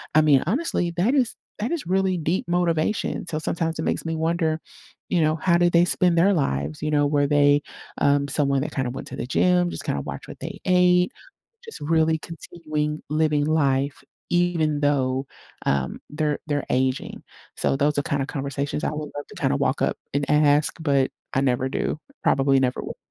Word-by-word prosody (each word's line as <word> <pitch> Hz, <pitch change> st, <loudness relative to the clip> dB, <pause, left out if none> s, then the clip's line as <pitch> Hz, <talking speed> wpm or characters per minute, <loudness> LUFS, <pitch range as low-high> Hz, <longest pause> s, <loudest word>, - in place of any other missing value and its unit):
I 155 Hz, -, +7 dB
mean, 145 Hz, -4 st, +4 dB
honestly, 195 Hz, -, 0 dB
that 215 Hz, +11 st, +2 dB
is 250 Hz, -5 st, +2 dB, 0.3 s
that 220 Hz, +3 st, -2 dB
is 340 Hz, -, -3 dB
really 190 Hz, 0 st, +1 dB
deep 165 Hz, +3 st, -1 dB
motivation. 175 Hz, +2 st, 0 dB
So 155 Hz, -2 st, -2 dB
sometimes 165 Hz, 0 st, -2 dB
it -, -, 0 dB
makes -, -, -1 dB
me 165 Hz, 0 st, -2 dB
wonder, 160 Hz, 0 st, 0 dB, 0.5 s
you 175 Hz, -, +2 dB
know, 155 Hz, 0 st, +2 dB
how 170 Hz, +2 st, +2 dB
did 175 Hz, 0 st, +3 dB
they 170 Hz, +1 st, +6 dB
spend 175 Hz, -1 st, +2 dB
their 190 Hz, +4 st, +5 dB
lives? 75 Hz, -, -1 dB
You 155 Hz, -, -1 dB
know, 145 Hz, -1 st, +3 dB
were 145 Hz, -1 st, +2 dB
they, 145 Hz, 0 st, +4 dB, 0.4 s
um, 140 Hz, 0 st, +3 dB
someone 140 Hz, -2 st, +1 dB
that 150 Hz, -, -4 dB
kinda 130 Hz, -3 st, -1 dB
went -, -, -7 dB
to -, -, -7 dB
the -, -, -4 dB
gym, 180 Hz, +5 st, +2 dB
just -, -, -5 dB
kinda 70 Hz, -, -1 dB
watch -, -, -7 dB
what -, -, -10 dB
they -, -, -6 dB
ate, 180 Hz, 0 st, +4 dB, 0.5 s
just 450 Hz, -, -8 dB
really 160 Hz, +1 st, +2 dB
continuing 155 Hz, -2 st, -4 dB
living 150 Hz, -1 st, +2 dB
life 140 Hz, -3 st, +1 dB, 0.3 s
even 170 Hz, -4 st, +1 dB
though, 135 Hz, -2 st, +1 dB, 0.4 s
um, 70 Hz, -2 st, 0 dB
they're 150 Hz, -1 st, -1 dB
they're 145 Hz, -2 st, -1 dB
aging. 130 Hz, 0 st, -1 dB, 0.3 s
So -, -, +1 dB
those 145 Hz, +1 st, +1 dB
are -, -, +2 dB
kinda 140 Hz, -1 st, -1 dB
conversations 140 Hz, 0 st, -3 dB
I -, -, 0 dB
would 150 Hz, -1 st, -5 dB
love 145 Hz, -, -5 dB
to -, -, -13 dB
kinda -, -, +1 dB
walk -, -, 0 dB
up -, -, +1 dB, 0.2 s
and 140 Hz, 0 st, 0 dB
ask, 150 Hz, 0 st, +3 dB
but 140 Hz, -4 st, +2 dB, 0.2 s
I 135 Hz, -, +2 dB
never 130 Hz, -1 st, +1 dB
do. 145 Hz, -, -2 dB, 0.3 s
Probably 135 Hz, 0 st, +3 dB
never 125 Hz, -1 st, 0 dB
would. -, -, -7 dB
150 Hz, 190 wpm, -24 LUFS, 140-170 Hz, 0.5 s, I